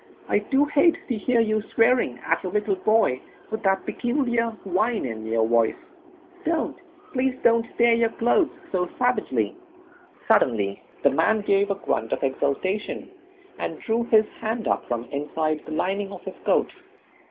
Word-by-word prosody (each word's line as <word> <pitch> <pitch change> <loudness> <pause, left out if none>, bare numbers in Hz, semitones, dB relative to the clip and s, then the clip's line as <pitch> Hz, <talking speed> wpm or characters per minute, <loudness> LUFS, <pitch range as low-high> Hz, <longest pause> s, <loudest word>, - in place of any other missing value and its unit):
I - - +2
do 270 +7 +2
hate 300 +3 +3
to 245 - +1
hear 230 +2 +2
you 215 -1 +1
swearing 225 - +3
at - - +1
your 185 - -4
little 210 0 0
boy, 215 - +2 0.3
with 220 - -3
that 190 -1 +1
peculiar 240 -2 0 0.2
whine 210 - 0
in 110 -2 -5
your 110 0 +1
voice. 115 -1 +3 0.7
Don't 330 -3 -1 0.4
please 260 -1 +1
don't 230 -1 +4
tear 235 0 +5
your 230 0 +3
clothes 240 - +2 0.2
so 180 -2 0
savagely." 250 0 0 0.7
Suddenly 110 - +2 0.2
the - - +5
man 220 -1 +2
gave 200 0 +2
a 200 - +1
grunt 115 - -2
of - - -3
exultation, 165 - -2 0.5
and - - -3
drew 230 +1 0
his 220 -2 +5
hand 225 0 -2
up - - 0
from 120 -1 -2
inside 155 +2 -2
the - - -7
lining 195 +5 -1
of - - -9
his - - -6
coat. - - +2
215 Hz, 160 wpm, -24 LUFS, 155-235 Hz, 0.7 s, tear